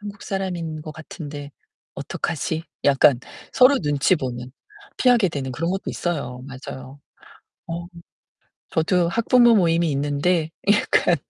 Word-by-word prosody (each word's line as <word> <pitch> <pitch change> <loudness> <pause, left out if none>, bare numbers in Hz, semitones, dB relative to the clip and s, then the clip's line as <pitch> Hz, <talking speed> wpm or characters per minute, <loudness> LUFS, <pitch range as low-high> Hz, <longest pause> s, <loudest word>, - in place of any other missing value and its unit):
'한국 205 -1 -9
사람인 175 -5 -4
것 155 - -8
같은데 145 -2 -8 0.4
어떡하지?' 160 0 -3 0.2
약간 135 -2 +5 0.3
서로 265 +2 +6
눈치 145 +2 +2
보는 125 -3 -5 0.5
피하게 245 -6 +4
되는 135 -5 -4
그런 165 +7 -2
것도 195 +1 -3
있어요. 135 -8 -3
맞아요. 130 0 -9 0.7
어. 170 +1 -5 0.9
저도 170 +2 +2
학부모 235 +4 +4
모임이 170 -3 +3
있는데 145 +4 0 0.2
약간 190 -4 +3
160 Hz, 265 characters per minute, -22 LUFS, 140-185 Hz, 0.9 s, 서로